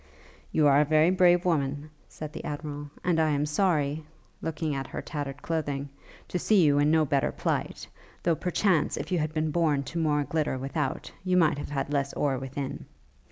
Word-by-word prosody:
'You 155 Hz, -, +3 dB
are 145 Hz, 0 st, +6 dB
a -, -, +3 dB
very 155 Hz, +3 st, +4 dB
brave 180 Hz, -1 st, +4 dB
woman,' 145 Hz, -2 st, 0 dB, 0.2 s
said 155 Hz, -1 st, -8 dB
the -, -, -7 dB
Admiral, 145 Hz, -1 st, -5 dB
'and 175 Hz, -2 st, +2 dB
I 160 Hz, -1 st, +3 dB
am 145 Hz, 0 st, +1 dB
sorry,' 150 Hz, -2 st, +1 dB, 0.4 s
looking 160 Hz, -1 st, -2 dB
at 135 Hz, -1 st, -3 dB
her -, -, -6 dB
tattered 145 Hz, -2 st, -5 dB
clothing, 145 Hz, -4 st, -2 dB, 0.4 s
'to 180 Hz, -, -2 dB
see 200 Hz, 0 st, +4 dB
you 145 Hz, -1 st, +4 dB
in 145 Hz, +1 st, +3 dB
no 160 Hz, 0 st, +4 dB
better 140 Hz, -1 st, +1 dB
plight: -, -, -2 dB, 0.4 s
though, 170 Hz, -, +3 dB
perchance, 180 Hz, -1 st, +1 dB
if 170 Hz, -, -5 dB
you 180 Hz, -, +2 dB
had 155 Hz, 0 st, -1 dB
been 155 Hz, 0 st, -1 dB
born 150 Hz, -4 st, +2 dB
to 165 Hz, +6 st, -4 dB
more 150 Hz, -2 st, +2 dB
glitter 150 Hz, -3 st, -1 dB
without, 135 Hz, +1 st, -3 dB
you 185 Hz, -1 st, +2 dB
might 155 Hz, -4 st, +3 dB
have -, -, -6 dB
had 140 Hz, 0 st, -2 dB
less 140 Hz, -1 st, 0 dB
ore 135 Hz, -3 st, 0 dB
within. 135 Hz, +1 st, -5 dB
150 Hz, 195 wpm, -27 LUFS, 145-165 Hz, 0.4 s, are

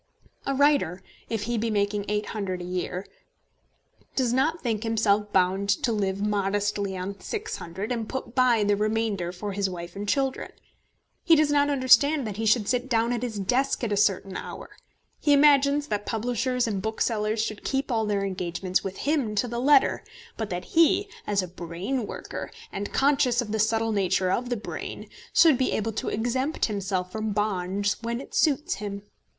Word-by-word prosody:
A 275 Hz, -, 0 dB
writer, 275 Hz, -, +2 dB, 0.3 s
if 225 Hz, -2 st, -2 dB
he 235 Hz, +1 st, -1 dB
be 230 Hz, +1 st, -1 dB
making 205 Hz, -1 st, 0 dB
£800 210 Hz, -3 st, -2 dB
a -, -, -6 dB
year, 180 Hz, +1 st, -3 dB, 1.1 s
does 250 Hz, -3 st, +1 dB
not 310 Hz, +6 st, +1 dB
think 225 Hz, -4 st, -1 dB
himself 210 Hz, -2 st, +1 dB
bound 190 Hz, +1 st, +2 dB
to 200 Hz, +4 st, +2 dB
live 195 Hz, -3 st, -1 dB
modestly 205 Hz, -1 st, 0 dB
on 185 Hz, +2 st, -4 dB
£600, 200 Hz, -, -5 dB
and 230 Hz, -3 st, -2 dB
put 260 Hz, -3 st, -5 dB
by 250 Hz, -4 st, +4 dB
the 205 Hz, 0 st, +3 dB
remainder 215 Hz, -4 st, -1 dB
for 200 Hz, +3 st, -5 dB
his 200 Hz, 0 st, -1 dB
wife 175 Hz, -1 st, -7 dB
and 205 Hz, +1 st, -4 dB
children. 270 Hz, -2 st, 0 dB, 0.7 s
He 335 Hz, -2 st, +6 dB
does 305 Hz, -1 st, +3 dB
not 290 Hz, 0 st, +3 dB
understand 280 Hz, +1 st, +4 dB
that 205 Hz, -2 st, -5 dB
he 225 Hz, 0 st, -1 dB
should 215 Hz, -1 st, +3 dB
sit 250 Hz, +1 st, 0 dB
down 230 Hz, 0 st, +2 dB
at 235 Hz, -, -2 dB
his 235 Hz, -4 st, -3 dB
desk 250 Hz, +8 st, 0 dB
at 225 Hz, -, -1 dB
a -, -, +2 dB
certain 195 Hz, -2 st, +1 dB
hour. -, -, -7 dB, 0.5 s
He 290 Hz, -, +3 dB
imagines 285 Hz, 0 st, +5 dB
that 205 Hz, -1 st, -2 dB
publishers 245 Hz, +2 st, 0 dB
and 205 Hz, -4 st, -2 dB
booksellers 220 Hz, 0 st, -1 dB
should 215 Hz, -2 st, -5 dB
keep 270 Hz, 0 st, -1 dB
all 220 Hz, -2 st, +1 dB
their 200 Hz, -1 st, 0 dB
engagements 180 Hz, -1 st, -2 dB
with 195 Hz, -1 st, -5 dB
him 280 Hz, -8 st, +1 dB
to 230 Hz, +4 st, +1 dB
the 235 Hz, 0 st, -3 dB
letter; 280 Hz, +1 st, +4 dB, 0.3 s
but 220 Hz, -2 st, -4 dB
that 180 Hz, 0 st, -4 dB
he, 370 Hz, +5 st, +3 dB, 0.2 s
as 200 Hz, -2 st, +1 dB
a -, -, -5 dB
brain 180 Hz, +8 st, -4 dB
worker, -, -, -6 dB, 0.2 s
and 200 Hz, +1 st, -4 dB
conscious 270 Hz, -3 st, +3 dB
of 230 Hz, -4 st, -1 dB
the 220 Hz, -, -1 dB
subtle 225 Hz, +1 st, +1 dB
nature 190 Hz, -2 st, +1 dB
of 245 Hz, +4 st, -1 dB
the 245 Hz, -, -1 dB
brain, 210 Hz, -, -6 dB, 0.2 s
should 315 Hz, -7 st, +5 dB
be 260 Hz, -, +1 dB
able 220 Hz, +1 st, -1 dB
to 220 Hz, -, -3 dB
exempt 255 Hz, +7 st, 0 dB
himself 190 Hz, -3 st, -2 dB
from 215 Hz, 0 st, -2 dB
bonds 200 Hz, -1 st, 0 dB
when 235 Hz, +1 st, -2 dB
it 275 Hz, -, -11 dB
suits 310 Hz, +4 st, +1 dB
him. 200 Hz, -1 st, -5 dB
215 Hz, 180 wpm, -26 LUFS, 200-255 Hz, 1.1 s, He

